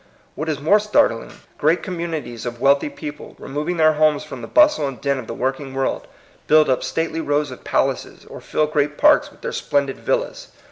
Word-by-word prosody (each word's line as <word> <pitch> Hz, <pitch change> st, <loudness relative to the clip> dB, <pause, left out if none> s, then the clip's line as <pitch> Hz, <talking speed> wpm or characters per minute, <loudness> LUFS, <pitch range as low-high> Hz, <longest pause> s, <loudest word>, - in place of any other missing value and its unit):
What 155 Hz, +2 st, -4 dB
is 150 Hz, -2 st, -2 dB
more 165 Hz, +9 st, +4 dB
startling, 205 Hz, -, +1 dB, 0.3 s
great 160 Hz, +4 st, +2 dB
communi 170 Hz, -4 st, -4 dB
ties 120 Hz, 0 st, -7 dB
of 120 Hz, 0 st, -6 dB
wealthy 140 Hz, +3 st, +3 dB
people, 145 Hz, 0 st, -9 dB
removing 150 Hz, +6 st, -4 dB
their 155 Hz, -1 st, +5 dB
homes 155 Hz, -1 st, +2 dB
fi -, -, -8 dB
om -, -, -9 dB
the -, -, -7 dB
bustle 300 Hz, -, +4 dB
and 135 Hz, -2 st, -7 dB
din 140 Hz, -1 st, 0 dB
of 120 Hz, -, -8 dB
the 115 Hz, -, -5 dB
working 135 Hz, +1 st, -3 dB
world, 135 Hz, 0 st, -2 dB, 0.4 s
build 155 Hz, -2 st, +5 dB
up 130 Hz, -, +1 dB
stately 165 Hz, 0 st, -2 dB
rows 145 Hz, -2 st, 0 dB
of 125 Hz, -, -11 dB
palaces, -, -, -1 dB
or -, -, -11 dB
fill 155 Hz, -, 0 dB
great 150 Hz, -1 st, -1 dB
parks -, -, +4 dB
with -, -, -21 dB
their -, -, -4 dB
splendid 140 Hz, -2 st, -1 dB
villas. -, -, -2 dB
150 Hz, 205 wpm, -21 LUFS, 135-160 Hz, 0.4 s, their